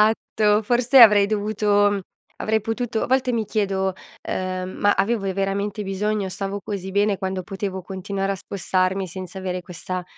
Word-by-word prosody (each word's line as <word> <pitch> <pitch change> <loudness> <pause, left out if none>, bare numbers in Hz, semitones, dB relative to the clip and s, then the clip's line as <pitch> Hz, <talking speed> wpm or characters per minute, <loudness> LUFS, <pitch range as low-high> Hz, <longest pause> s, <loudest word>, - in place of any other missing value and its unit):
Esatto. 215 0 +2
Forse, 245 +4 +4
avrei 210 -3 +9
dovuto 205 -1 +2
mhmm, 200 -1 -1 0.4
avrei 220 0 +1
potuto 225 +1 -2
a - - 0
volte 260 0 +1
mi 230 -2 0
chiedo, 195 -3 0 0.4
uhm, 185 0 -3
"Ma 205 - +4
avevo 205 +2 0
io, 190 - 0
veramente, 200 +2 -1
bisogno? 200 +1 -1
Stavo 195 +2 -4
così 195 -2 -5
bene 200 +1 +2
quando 190 -1 -3
potevo 190 +1 -4
continuare 195 +1 -3
a - - -2
spostarmi 190 0 -1
senza 185 +1 -7
avere 185 -1 -3
questa” 180 0 -5
200 Hz, 165 wpm, -23 LUFS, 190-215 Hz, 0.4 s, avrei